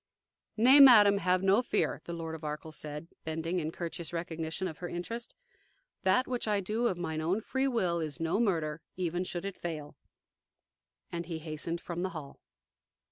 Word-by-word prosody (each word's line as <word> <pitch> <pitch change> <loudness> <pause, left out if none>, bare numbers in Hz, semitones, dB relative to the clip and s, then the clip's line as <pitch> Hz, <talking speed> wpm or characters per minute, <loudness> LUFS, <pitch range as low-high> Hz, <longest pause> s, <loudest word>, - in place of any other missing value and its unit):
"Nay, 255 +6 +7
madam, 210 -7 +9
have 185 0 +2
no 195 +4 +5
fear," 250 - 0
the 170 - -5
Lord 165 -1 -5
of 160 -1 -8
Arkell 150 +1 -5
said, 150 +1 -6 0.2
bending 160 +3 -2
in 155 -2 -2
courteous 170 -1 -5
recognition 165 +1 -3
of 160 -4 -8
her 175 - -5
interest; 230 +7 -5 0.7
"that 245 +8 +3
which 245 -3 -2
I 210 -1 +2
do 215 +5 0
of 185 - -1
mine 160 -3 -3
own 175 +6 +1
free 265 +4 -1
will 185 -10 +1
is 155 -3 -4
no 165 +5 0
murder, 165 -8 0 0.2
even 175 0 -1
should 180 0 -5
it 195 - -5
fail." 155 -4 -5 1.2
And 170 -1 -4
he 165 -2 -3
hastened 160 +2 -4
from 175 0 -4
the 185 - -1
hall. 155 -5 -9
175 Hz, 180 wpm, -31 LUFS, 160-200 Hz, 1.2 s, madam